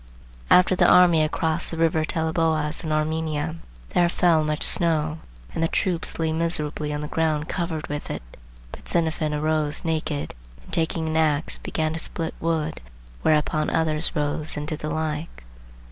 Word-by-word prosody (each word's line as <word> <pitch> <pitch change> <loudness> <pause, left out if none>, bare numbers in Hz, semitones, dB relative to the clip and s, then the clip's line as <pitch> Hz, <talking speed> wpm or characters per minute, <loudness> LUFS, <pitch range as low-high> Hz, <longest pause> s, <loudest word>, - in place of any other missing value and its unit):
"After 180 +1 +6
the - - +5
army 175 -3 +6
had 155 - +2
crossed 160 -1 0
the 165 - -4
river 160 -1 +2
Teleboas 160 -1 0
in 155 - -3
Armenia, 155 0 -1 0.3
there 175 -1 +3
fell 170 -3 +3
much 150 0 0
snow, 160 -2 +2 0.3
and - - -3
the - - +3
troops 175 0 -1
lay 160 -1 0
miserably 155 -2 -2
on 150 0 -3
the 150 - -4
ground 155 -1 0
covered 170 -3 -3
with 145 0 -5
it. - - -5 0.5
But - - -11
Xenophon 160 -2 0
arose 150 0 0
naked, 155 -3 -2 0.3
and - - -16
taking 160 0 0
an 160 0 -1
axe, 155 -1 +1
began 155 -1 -2
to 165 - -4
split 165 0 -2
wood; 160 -1 -2 0.4
whereupon 155 0 +2
others 160 +1 +3
rose 150 +1 -1
and 150 0 -4
did 155 -1 -3
the 155 - -4
like." 155 - -4
160 Hz, 165 wpm, -24 LUFS, 150-165 Hz, 0.5 s, After